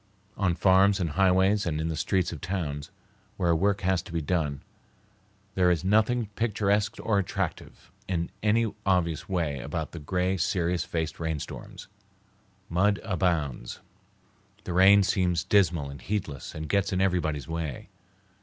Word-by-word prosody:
On 95 -4 +1
farms 95 +3 +4
and 85 -4 -1
highways 95 +3 +3
and 75 -2 -1
in 80 - -1
the 80 - -2
streets 90 +2 0
of 80 - -8
towns, 85 -7 -3 0.5
where 85 -2 +2
work 100 +4 +1
has 95 -1 +1
to - - -13
be 85 - -1
done, 75 -3 -1 0.9
there 90 -1 +3
is 85 -4 +1
nothing 110 +4 +2
picturesque 105 -2 +1
or 105 -3 +2
attractive 95 - -4 0.2
in 85 -3 -2
any 110 +1 +2
obvious 90 -3 0
way 80 -7 -1
about 75 +4 -4
the 85 - -7
gray, 90 +5 -1
serious 85 0 0
faced 80 -2 -3
rainstorms. 80 -3 -5 0.8
Mud 100 +4 +2
abounds. 85 - -1 0.8
The 90 - -4
rain 100 +3 +7
seems 90 -4 +1
dismal 85 -8 +2
and 70 - -10
heedless 90 -10 -4
and 80 0 -5
gets 100 +1 +1
in 95 - 0
everybody's 85 -7 0
way. 80 -5 -5
90 Hz, 145 wpm, -27 LUFS, 80-100 Hz, 0.9 s, rain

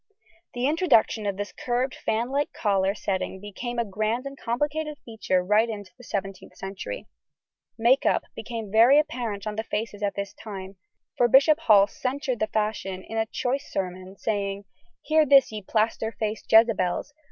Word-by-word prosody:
The 245 +1 -1
introduction 285 - +3
of 200 -1 -2
this 205 0 -4
curved 250 +2 -1
fanlike 255 +6 -1
collar 195 -2 +1
setting 190 -2 -3
became 220 +5 -6
a 235 - +1
grand 215 +5 -2
and 275 0 -6
complicated 295 +5 -2
feature 215 -5 0
right 210 +5 +3
into 205 -3 -6
the 250 - -16
17th 195 -3 -5
century. 195 - -6 0.7
"Make 240 +4 +4
up" - - +2
became 225 -4 -6
very 235 +6 +6
apparent 235 -9 -1
on 210 0 -4
the 220 - -1
faces 210 -1 -4
at 205 -1 -1
this 200 0 -4
time, 195 -3 -8 0.4
for 245 - +4
Bishop 280 +6 +5
Hall 210 -10 +6
censured 260 +2 -3
the 215 - +1
fashion 210 -4 -2
in 225 +1 -3
a 220 - 0
choice 260 +5 -2
sermon, 185 0 -4
saying, 200 -2 -2 0.4
"Hear 315 0 +4
this, 275 -4 +5
ye 215 -1 -5
plaster 220 +2 0
faced 215 -1 -4
Jezabels! 220 0 +3
220 Hz, 165 wpm, -26 LUFS, 200-250 Hz, 0.7 s, very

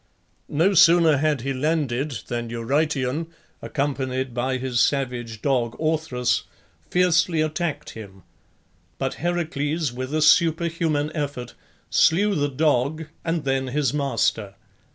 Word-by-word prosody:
No 170 +7 +2
sooner 170 -4 +6
had 150 -2 +1
he 135 +2 -2
landed 140 -4 -1
than 120 -1 -4
Eurytion, 135 +5 -1 0.3
accompanied 130 -3 -2
by 130 +2 -1
his 130 -2 -2
savage 120 -6 -1
dog 125 -5 0
Orthrus, 155 -6 0 0.4
fiercely 180 -2 +2
attacked 155 -1 -2
him; 100 -4 -11 0.7
but - - -2
Heracles, 160 -4 -1
with 130 +2 -5
a 155 - +2
superhuman 165 -3 +2
effort, 140 -6 -4 0.4
slew 200 +6 +3
the 145 -5 0
dog 150 +2 0
and 165 -2 -1
then 135 -1 0
his 140 0 0
master. 110 -8 -1
145 Hz, 115 wpm, -23 LUFS, 125-160 Hz, 0.7 s, sooner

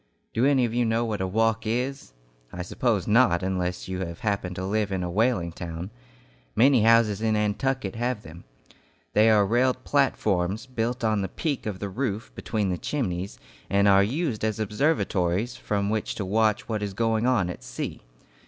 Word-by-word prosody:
Do 120 +4 +3
any 135 -3 +4
of 115 - -3
you 120 0 +2
know 115 +1 +1
what 105 -4 -2
a 95 - 0
"walk" 115 +3 +1
is? 125 - -2 0.4
I 90 0 -5
suppose 105 +1 -1
not, 105 -6 +4
unless 90 -1 -2
you 95 0 -4
have 85 -3 -5
happened 100 -4 -1
to 95 - -4
live 105 +1 0
in 95 -1 -1
a 90 - -3
whaling 105 -4 +1
town. 85 +1 -6 0.6
Many 130 +1 +5
houses 110 -2 +4
in 110 -1 +1
Nantucket 105 +1 -1
have 120 -2 -2
them. 85 +2 -11 0.7
They 110 +2 +5
are 105 -2 +5
railed 125 +4 +1
platforms, 105 -8 +1
built 120 -1 -3
on 110 -2 +2
the 95 - -3
peak 145 - -3
of 105 -3 -3
the 100 +1 -4
roof 110 0 -3
between 105 -3 -2
the 90 - -2
chimneys, 95 -9 -3 0.3
and 100 +1 +3
are 100 0 +6
used 125 - -1
as 110 -1 -1
observatories 105 - 0
from 100 0 -1
which 110 -1 -2
to 100 - -3
watch 110 +1 +1
what 110 -2 -2
is 100 -2 -4
going 115 +1 +1
on 115 -8 +2
at 75 - -10
sea. - - -5
105 Hz, 185 wpm, -26 LUFS, 95-120 Hz, 0.7 s, are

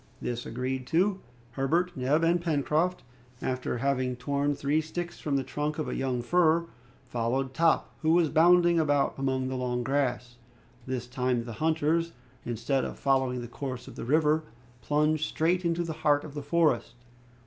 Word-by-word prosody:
This 120 0 -4
agreed 130 +2 -3
to, 185 +4 +2 0.3
Herbert, 170 +7 0
Neb, 135 +5 +1
and 170 +1 +3
Pencroft, 165 +2 0 0.4
after 130 -1 -2
having 130 -1 0
torn 140 +3 -1
three 145 +3 +1
sticks 175 +2 -5
from 145 -2 -1
the 135 - +1
trunk 150 +3 -3
of 155 - -2
a - - -3
young 130 -2 -1
fir, 170 +3 +3 0.4
followed 125 +2 -1
Top, 165 +2 +2
who 160 0 +2
was 170 -2 +4
bounding 175 +1 +5
about 145 -3 +2
among 130 -1 0
the 130 - -3
long 125 -1 -1
grass. 125 -2 -1 0.5
This 130 -2 -3
time, 125 -1 -1
the 115 -1 -7
hunters, 160 +1 +1 0.3
instead 125 +3 -1
of - - -5
following 130 -2 +1
the 120 - -6
course 130 0 -6
of - - -10
the - - -6
river, 155 +3 +2 0.4
plunged 150 +2 +1
straight 175 +3 0
into 170 0 0
the 165 -1 -4
heart 145 -2 +3
of 150 - -9
the 145 - -5
forest. 145 -5 +1
145 Hz, 170 wpm, -28 LUFS, 130-160 Hz, 0.5 s, bounding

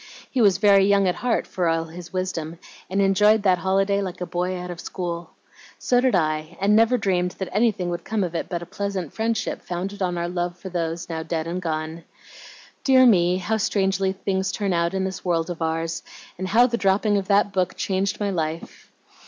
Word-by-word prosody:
He 255 - +1
was 200 -4 +5
very 200 -1 +5
young 200 -1 +4
at 180 - +2
heart 245 +4 -1
for 180 -2 -2
all 165 0 +1
his 170 +1 -10
wisdom, 170 -3 -3 0.3
and 190 +2 -1
enjoyed 210 +2 +4
that 185 -3 +3
holiday 195 +2 +1
like 185 -2 -5
a 180 - -3
boy 180 +1 -2
out 180 0 -6
of 170 - -8
school. 170 -3 -5 0.5
So 245 -1 +2
did 255 -4 +2
I, 155 0 -1
and 200 +2 +3
never 230 +3 +4
dreamed 180 -4 0
that 190 - -4
anything 205 -4 +1
would 175 0 -4
come 220 -2 -1
of 175 -2 -3
it 170 - -3
but 175 -2 -3
a - - -8
pleasant 195 -4 -4
friendship 225 -2 -2
founded 190 +3 -5
on 180 -2 0
our 170 0 -1
love 175 0 -3
for 190 - -8
those 170 -1 -3
now 160 -1 -4
dead 160 -1 -3
and 175 +2 -3
gone. 160 0 -4 0.8
Dear 260 -1 +6
me! 180 -6 +4
how 210 +4 -1
strangely 195 -2 +1
things 190 0 -2
turn 200 -3 -1
out 170 +1 0
in 190 - 0
this 190 0 -4
world 170 -1 0
of 170 - -7
ours, 165 0 -2 0.3
and 185 +1 -4
how 230 +6 +5
the 235 -1 -1
dropping 205 +1 +2
of 195 -1 -2
that 200 0 +3
book 185 -2 0
changed 190 0 -1
my 205 -1 0
life! 160 -2 -4
185 Hz, 210 wpm, -23 LUFS, 170-200 Hz, 0.8 s, Dear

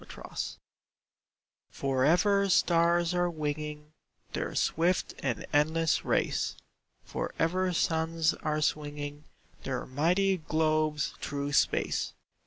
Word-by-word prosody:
ACTION - - -11 1.3
For 135 -1 -1
ever 200 +6 +4
stars 170 -1 +3
are 175 0 +2
winging 150 -1 -4 0.4
Their - - -3
swift 175 +3 +1
and 125 -5 -2
endless 160 +2 +2
race; - - 0 0.5
For - - -4
ever 185 +3 +1
suns 160 -1 +1
are 155 0 -2
swinging 145 -1 -2 0.4
Their 130 -2 -3
mighty 180 +8 +2
globes 155 -2 0
through 145 0 -3
space. - - +1
155 Hz, 100 wpm, -29 LUFS, 150-170 Hz, 1.3 s, ever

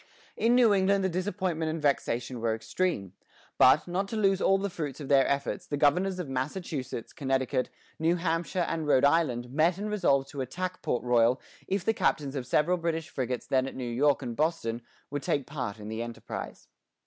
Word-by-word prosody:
In 235 +2 +3
New 240 -4 +6
England 195 0 +3
the 190 - +2
disappointment 180 -3 -1
and 160 +1 -2
vexation 130 -4 -1
were 115 -1 +1
extreme; 110 - -2 0.5
but, 135 +6 +6
not 185 +3 -1
to 225 - -5
lose 195 -3 +2
all 195 - +4
the 200 +1 -2
fruits 145 -6 -5
of 145 - -7
their 135 -2 +5
efforts, 140 +6 -2
the 145 - -2
governors 180 +7 +2
of 180 -4 -4
Massachusetts, 135 -2 -4
Connecticut, 130 -2 0 0.3
New 165 +2 +2
Hampshire, 170 +1 -1
and 160 -2 -2
Rhode 135 -2 +5
Island 135 -6 +1
met 165 +5 +2
and 210 +1 -4
resolved 140 -10 +2
to 140 - -5
attack 180 +8 -4
Port 120 - -1
Royal 120 +1 +3 0.3
if 190 -1 -1
the 225 - +3
captains 145 -9 0
of 130 -3 -4
several 160 +6 +2
British 165 -1 -2
frigates 125 -2 -3
then 130 0 +1
at - - -7
New 130 - -4
York 140 +3 +2
and 120 -2 -4
Boston 145 -7 -1 0.3
would 145 -1 -2
take 140 0 0
part 130 -9 -4
in 105 - -8
the 110 +1 -4
enterprise. 115 -2 -7
150 Hz, 195 wpm, -28 LUFS, 130-180 Hz, 0.5 s, New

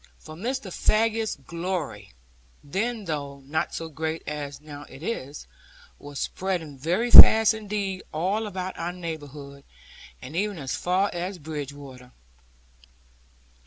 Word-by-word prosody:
For 155 - -12
Mr. 225 +3 -4
Faggus's 225 0 +1
glory, 165 - -5 0.5
then, 215 +8 -2
though 140 -4 -4
not 155 +5 -2
so 165 - -4
great 160 +1 -4
as 145 -2 -5
now 145 -1 -10
it 135 - -12
is, 150 - -4 0.5
was 145 0 -9
spreading 175 -6 -3
very 180 - 0
fast 220 -1 +11
indeed 205 -3 -3
all 195 +8 -1
about 185 -2 -5
our 175 +1 -2
neighbourhood, 145 -5 -7 0.6
and 130 +5 -9
even 205 +1 -1
as 135 -3 -3
far 185 +3 +1
as 180 +2 -3
Bridgewater. 140 -4 -8
165 Hz, 125 wpm, -26 LUFS, 145-195 Hz, 0.6 s, fast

